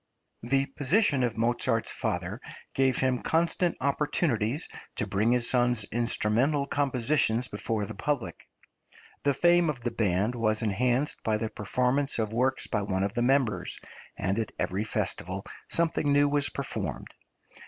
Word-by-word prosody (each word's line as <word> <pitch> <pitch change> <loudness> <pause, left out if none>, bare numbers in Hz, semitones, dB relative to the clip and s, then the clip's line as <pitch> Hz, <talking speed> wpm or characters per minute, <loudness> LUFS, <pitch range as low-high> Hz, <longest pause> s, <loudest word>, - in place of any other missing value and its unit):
The 135 +4 +1
position 145 +2 +1
of 120 -3 0
Mozart's 115 0 +1
father - - -3 0.3
gave 130 -2 +2
him 130 -1 +1
constant 170 +1 +1
opportunities 140 -2 0 0.3
of 105 - -1
bringing 110 +4 +3
his 125 -1 +1
son's 120 -3 +2
instrumental 120 +5 +1
compositions 130 -3 +1
before 105 0 -2
the 110 - -7
public. 115 - -3 0.7
The 140 -1 +2
fame 175 +2 +4
of 135 -5 -3
the 120 0 -2
band 105 0 +1
was 110 -2 0
enhanced 125 +7 0
by 110 -1 +1
the 110 0 -2
performance 125 +6 0
of 110 -1 -1
works 130 +3 +1
by 105 - -1
one 95 -1 -1
of 100 +1 -1
the 120 - -1
members, 130 -3 +1 0.4
and 95 +4 0
at 110 - -2
every 100 +4 -1
festival - - -2 0.2
something 165 -3 +1
new 145 0 +5
was 145 -1 +1
performed. - - -5
125 Hz, 145 wpm, -28 LUFS, 110-140 Hz, 0.7 s, new